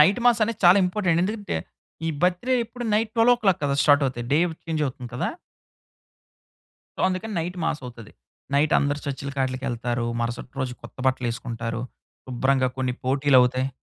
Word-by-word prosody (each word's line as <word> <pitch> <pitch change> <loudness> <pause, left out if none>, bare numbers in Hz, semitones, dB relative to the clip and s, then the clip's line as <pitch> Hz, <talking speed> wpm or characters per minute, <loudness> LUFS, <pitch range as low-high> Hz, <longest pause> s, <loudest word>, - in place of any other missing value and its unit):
Night 195 +10 +5
mass 235 -2 +4
అనేది 225 -1 -4
చాలా 180 +3 +8
important. 180 -3 +1
ఎందుకంటే, 205 - -3 0.5
ఈ - - +1
బర్త్ 180 +3 +2
డే 255 - +4 0.4
నైట్, 215 0 +1
12:00 225 -6 +4
కదా 140 -1 +1
స్టార్ట్ 145 -1 +5
అవుతాయి, 120 -2 -4
డే 150 - +5 0.3
చేంజ్ 160 -2 -1
అవుతుంది 125 -2 -7
కదా! - - -1 1.7
సో, - - -3
అందుకని 195 +3 -3
నైట్ 180 +2 -4
మాస్ 160 -2 -1
అవుతది. 115 -3 -11 0.4
నైట్ 150 +2 +3
అందరు 145 +1 0
చర్చ్‌లకి 140 0 -4
ఆట్లికి 130 +1 -3
ఎళ్తారు. 120 0 -2
మరుసటి 120 +1 -3
రోజు 130 -1 -2
కొత్త - - -12
బట్టలు 130 -1 +1
ఏసుకుంటారు. 115 0 -4 0.4
శుభ్రంగా 130 +1 +1
కొన్ని 125 -1 -1
పోటీలు 135 +1 +3
అవుతాయి. 130 +1 +1
140 Hz, 160 wpm, -24 LUFS, 125-180 Hz, 1.7 s, చాలా